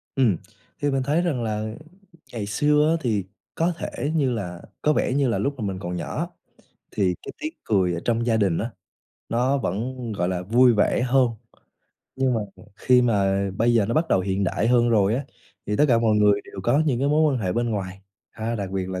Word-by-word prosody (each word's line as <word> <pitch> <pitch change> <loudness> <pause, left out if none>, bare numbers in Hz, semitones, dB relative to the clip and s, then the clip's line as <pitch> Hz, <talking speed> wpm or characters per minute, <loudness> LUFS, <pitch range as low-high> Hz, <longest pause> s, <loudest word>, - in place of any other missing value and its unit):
Ừm, 120 - +3 0.4
thì 145 0 +1
mình 135 -1 0
thấy 150 +6 +1
rằng 145 -9 -1
là 110 -1 -2 0.7
ngày 110 -3 -3
xưa 150 +8 +2
á, 165 - +3
thì 105 -7 0 0.3
có 170 +2 +1
thể 150 -2 -3
như 140 -5 +2
là 90 -7 -4 0.2
có 150 - +3
vẻ 130 - 0
như 140 0 +2
là 115 - 0
lúc 140 - -1
mà 110 - -2
mình 95 -2 -3
còn 90 -1 -4
nhỏ 85 - -3 0.6
thì 95 -3 +1
cái - - -6
tiếng 310 +1 -4
cười 95 -4 +1
ở 85 - -2
trong 115 0 +1
gia 115 -2 +2
đình 95 -6 +1
á, 115 +2 -3 0.6
nó 125 +4 +1
vẫn, 120 +2 -3
gọi 90 -3 -1
là, 90 -1 -2
vui 120 +6 +4
vẻ 105 +3 +2
hơn, 130 0 +3 0.9
nhưng 130 -2 +1
mà 115 - 0 0.4
khi 125 +1 +4
mà 100 -4 +1
bây 120 +3 +2
giờ 105 -4 +3
nó 115 - -1
bắt 160 +1 +1
đầu 95 - +3
hiện 95 +1 -1
đại 105 +4 0
hơn 120 -1 +4
rồi 105 -2 +3
á, 135 +3 -2 0.4
thì 105 - -1
tất 150 - +4
cả 115 -2 +4
mọi 110 -2 +2
người 105 -1 +4
đều 95 - -9
có 135 +8 +3
những 125 -5 +1
cái 140 +2 +1
mối 150 0 +3
quan 130 - -1
hệ 90 -2 0
bên 120 +3 0
ngoài, 95 -2 -4 0.3
a, 115 +1 -4
đặc 100 -4 -4
biệt 95 -1 -3
là 95 -1 -4
115 Hz, 225 wpm, -24 LUFS, 100-130 Hz, 0.9 s, vui